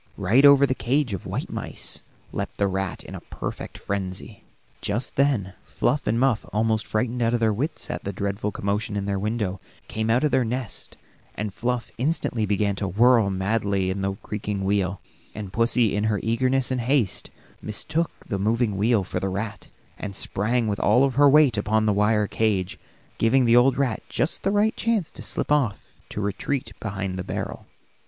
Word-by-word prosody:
Right 110 +8 +4
over 140 0 +8
the 130 - +1
cage 130 -1 0
of 95 - -5
white - - -4
mice - - -4 0.3
leaped - - -4
the 100 - +2
rat 95 -1 -2
in - - -10
a - - -5
perfect - - -6
frenzy. 95 -2 -5 0.4
Just 120 - -2
then 130 -10 +1
Fluff 145 - -1
and 115 - +2
Muff, 130 -4 +2
almost 110 0 +1
frightened 120 +3 -1
out 115 +1 +2
of - - 0
their 110 -2 +2
wits 140 +10 -2
at - - -5
the 100 - -3
dreadful 100 +1 -2
commotion 100 +2 -2
in 100 - -2
their 100 -1 -1
window, 105 -2 -2 0.3
came 110 +1 -2
out 120 +4 +3
of 150 - +2
their 130 - +3
nest, 120 -1 -5 0.4
and 105 -2 -3
Fluff 120 +1 -2
instantly 125 -6 0
began 100 0 +1
to 100 - -2
whirl 115 +2 +4
madly 95 -1 0
about - - -2
in 100 - -4
the 95 0 0
creaking 105 -1 -3
wheel, 100 -1 0 0.4
and 100 -3 -6
pussy 115 -2 +3
in 105 +1 0
her 105 -2 +1
eagerness 130 +3 +1
and 125 -1 0
haste 120 -4 0 0.3
mistook 155 +10 -1 0.2
the 100 -4 -2
moving 110 0 +1
wheel 110 0 +3
for - - -3
the 95 - -2
rat, 105 +2 -5 0.3
and 100 -2 -5
sprang 115 +5 0
with 105 -1 -1
all 125 +6 +4
her 145 +2 +5
weight 140 -7 +5
upon 110 +1 +1
the 105 - +3
wire 105 +1 +3
cage, 100 -4 0 0.4
giving 125 +3 +4
the 115 0 +5
old 125 +2 +5
rat 130 -5 0
just 155 - -1
the 195 - +1
right 210 +2 +2
chance 220 -7 0
to - - -10
slip - - -3
off 135 -8 +2 0.3
to - - -5
his - - -1
retreat 115 +4 -2
behind 95 -3 -3
the - - -3
barrel. - - -5
110 Hz, 190 wpm, -24 LUFS, 100-125 Hz, 0.4 s, over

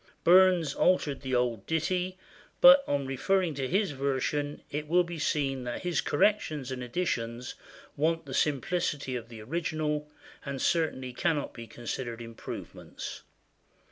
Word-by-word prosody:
Burns 180 -4 +6
altered 150 -6 +2
the 130 -2 -1
old 120 -4 0
ditty, 180 +3 -1 0.4
but 270 +1 +9
on 140 -1 0
referring 170 +6 +1
to 135 -2 -2
his 195 +4 +1
version 140 +2 -1
it 150 +1 -3
will 175 +3 +4
be 170 -1 -6
seen 135 -4 0
that 120 +7 -4
his 175 -1 +1
corrections 150 -6 +1
and 130 -1 -4
additions 120 -4 -2 0.4
want 165 +2 0
the 135 - -7
simplicity 145 -1 0
of 115 -1 -6
the 115 -2 -9
original, 155 +1 -2 0.3
and 140 -1 -4
certainly 130 -5 0
cannot 145 +3 0
be 115 -1 -9
considered 120 +1 -5
improvements. 115 -1 -8
145 Hz, 140 wpm, -29 LUFS, 130-170 Hz, 0.4 s, but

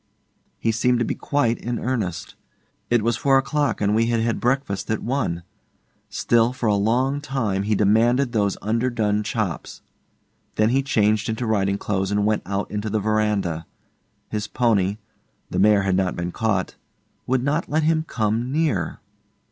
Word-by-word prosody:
He 115 - 0
seemed 125 +2 +2
to 120 - 0
be - - -1
quite 120 -5 0
in 120 +1 -3
earnest. 110 -10 -3 0.6
It 120 -3 +2
was 115 0 +1
four 135 +1 +3
o'clock, 140 +1 0
and 105 0 +2
we 115 +1 +2
had 115 -1 +1
had 115 0 0
breakfast 120 -6 -1
at 110 - -1
one; 115 -10 -1 0.7
still, 120 +1 +2
for 125 - -4
a 105 - +3
long 125 +8 +1
time, 120 -9 -1
he 105 +2 0
demanded 120 +6 +3
those 100 -4 0
underdone 110 -1 0
chops. 105 - -4 0.7
Then 110 +1 +3
he 135 +3 +2
changed 110 -5 +1
into 110 +2 -2
riding 100 -3 +1
clothes 95 -2 -1
and 100 0 +1
went 105 0 +1
out 100 +1 -2
into 105 +1 -3
the 110 +1 0
verandah. 105 -6 0 0.6
His 105 -1 -3
pony 105 -5 +1 0.5
the 90 - -1
mare 105 0 +5
had 95 -1 +1
not 95 -1 0
been 85 0 -3
caught 105 -4 -1 0.5
would 130 0 +1
not 150 +5 0
let 155 +2 +1
him 160 0 +2
come 115 +2 -1
near. 140 - -1
110 Hz, 165 wpm, -23 LUFS, 100-125 Hz, 0.7 s, mare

